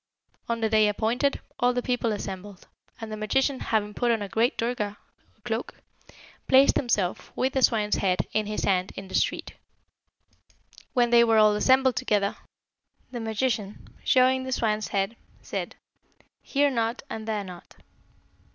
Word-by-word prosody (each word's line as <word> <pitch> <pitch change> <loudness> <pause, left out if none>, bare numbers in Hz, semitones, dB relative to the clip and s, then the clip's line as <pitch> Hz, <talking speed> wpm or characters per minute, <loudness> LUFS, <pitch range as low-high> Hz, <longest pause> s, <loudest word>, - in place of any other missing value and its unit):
On 230 0 -1
the 220 - +1
day 215 -1 +4
appointed, 230 +7 0 0.2
all 245 0 +3
the 245 0 -2
people 245 -3 0
assembled, 195 -1 -6 0.3
and 225 -1 -7
the - - -3
magician 265 +6 0
having 210 -2 -1
put 240 +3 0
on 225 -3 +1
a - - -5
great 225 - +1
durga 230 -3 -2 0.5
(cloak), - - -3 0.7
placed 270 +1 +6
himself, 205 -8 -1
with 260 +1 0
the 265 - +1
swine's 215 -4 +2
head 185 -2 +1
in 215 -1 0
his 210 - -3
hand, 185 -1 +1
in 195 -1 -8
the - - -11
street. - - 0 1.4
When 240 -2 +2
they 235 0 +7
were 225 -1 +3
all 215 -1 +5
assembled 260 +3 +3
together, 200 -1 0 0.8
the 245 - -5
magician, 220 -2 -2
showing 260 0 +4
the 260 - -5
swine's 215 -4 0
head, 200 +3 -2 0.3
said, - - -5 0.7
'Here 285 0 +1
not 230 0 -1
and 220 -5 -6
there 215 -2 -1
not.' 180 -2 -12
225 Hz, 155 wpm, -26 LUFS, 210-245 Hz, 1.4 s, they